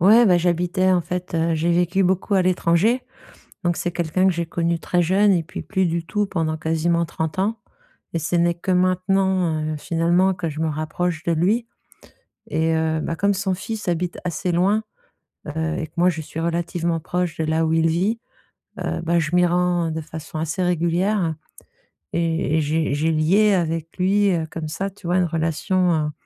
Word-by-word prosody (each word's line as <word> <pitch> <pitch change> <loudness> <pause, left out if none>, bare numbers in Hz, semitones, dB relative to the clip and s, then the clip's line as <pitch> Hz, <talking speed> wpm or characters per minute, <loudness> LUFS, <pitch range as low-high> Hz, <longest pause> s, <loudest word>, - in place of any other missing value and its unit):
Ouais 220 +6 +6
bah, 180 -2 +5
j'habitais 180 +2 +1
en 180 - +3
fait, 180 0 -5
heu, 165 0 +1
j'ai 165 +2 +1
vécu 180 +3 +2
beaucoup 190 +2 +1
à 190 - +4
l'étranger, 185 +7 +2 0.6
donc 175 -1 +1
c'est 175 - -2
quelqu'un 175 +2 +1
que 190 - +4
j'ai 170 0 -2
connu 170 0 -1
très 175 +1 0
jeune 195 +4 +4
et 170 -3 +2
puis 160 - -7
plus 190 -3 0
du 170 0 -1
tout 205 +3 -1
pendant 160 -4 -1
quasiment 165 +1 0
30 160 +1 -4
ans 210 +3 0 0.5
et 165 - 0
ce 160 +2 -3
n'est 170 0 +2
que 185 +2 -2
maintenant, 185 -2 +1
heu, - - -3
finalement 175 +4 +2
que 175 -2 -3
je 155 +1 -5
me 160 - +1
rapproche 155 +2 -2
de 170 - +1
lui. 205 +9 +1 0.8
Et 160 +1 0
heu, 160 0 0
bah 165 - -3
comme 200 +3 +2
son 190 0 -1
fils 210 +3 -5
habite 175 0 -1
assez 180 +1 -1
loin, 195 +6 +2 0.6
heu, 160 +2 -2
et 160 - -3
que - - -36
moi 180 +1 +5
je 160 -3 -1
suis 160 +2 -6
relativement 170 0 -1
proche 175 0 -2
de 160 - -1
là 160 +1 +1
où 160 - 0
il 165 0 +3
vit, 190 +8 0 0.6
heu, - - -2
bah 170 +1 +1
je 155 0 -2
m'y 180 0 +5
rends 175 -1 +1
de 160 - -3
façon 155 0 -8
assez 165 +4 -2
régulière 175 0 +1 0.8
et 165 -1 0
et - - +2
j'ai 155 0 0
j'ai 155 +3 +1
lié 190 +7 +3
avec 165 -2 -2
lui, 200 +2 +3
heu, 160 -2 -1
comme 160 -2 -5
ça 195 +5 -3
tu 190 -3 -11
vois? 180 +1 +2
Une 180 - +3
relation 165 0 0
170 Hz, 195 wpm, -22 LUFS, 160-185 Hz, 0.8 s, Ouais